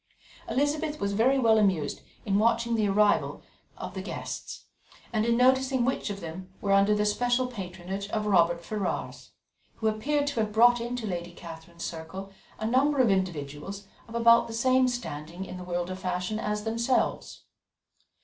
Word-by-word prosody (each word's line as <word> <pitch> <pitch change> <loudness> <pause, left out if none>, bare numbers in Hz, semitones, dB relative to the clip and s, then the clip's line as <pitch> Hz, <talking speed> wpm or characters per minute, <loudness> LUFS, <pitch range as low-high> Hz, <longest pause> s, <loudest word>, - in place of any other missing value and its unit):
Elizabeth 295 +2 0
was 200 0 -1
very 250 +6 +3
well 225 -4 +4
amused 185 -8 +1 0.2
in 200 -1 +2
watching 235 +1 +2
the 215 -2 +2
arrival 205 +1 +2 0.3
of - - -6
the - - -4
guests, - - -6 0.5
and 220 0 +1
in 235 0 +3
noticing 260 0 +3
which 260 -3 -1
of 200 -1 -5
them 185 +3 -8
were 200 - -1
under 200 +1 +5
the 210 0 +1
special 245 +4 +1
patronage 195 -3 -6
of 215 0 -1
the 210 - -2
Robert 170 -2 +3
Ferrars, 210 -1 -4 0.4
who 220 - -1
appeared 285 +7 0
to 285 -5 -2
have 215 -1 0
brought 240 +2 +5
into 240 0 -3
Lady 175 -3 -4
Catherine's 170 0 -9
circle 175 +4 -7 0.3
a 220 - -4
number 270 +5 +2
of 240 -5 +5
individuals 185 +1 -3 0.2
of 230 - -9
about 235 0 +5
the 230 - -7
same 255 +2 +3
standing 175 -7 -5
in 185 - -8
the 180 - -7
world 175 0 -3
of 185 - -5
fashion 185 +3 -2
as 210 -1 -2
themselves. 230 +3 -1
210 Hz, 170 wpm, -28 LUFS, 185-240 Hz, 0.5 s, under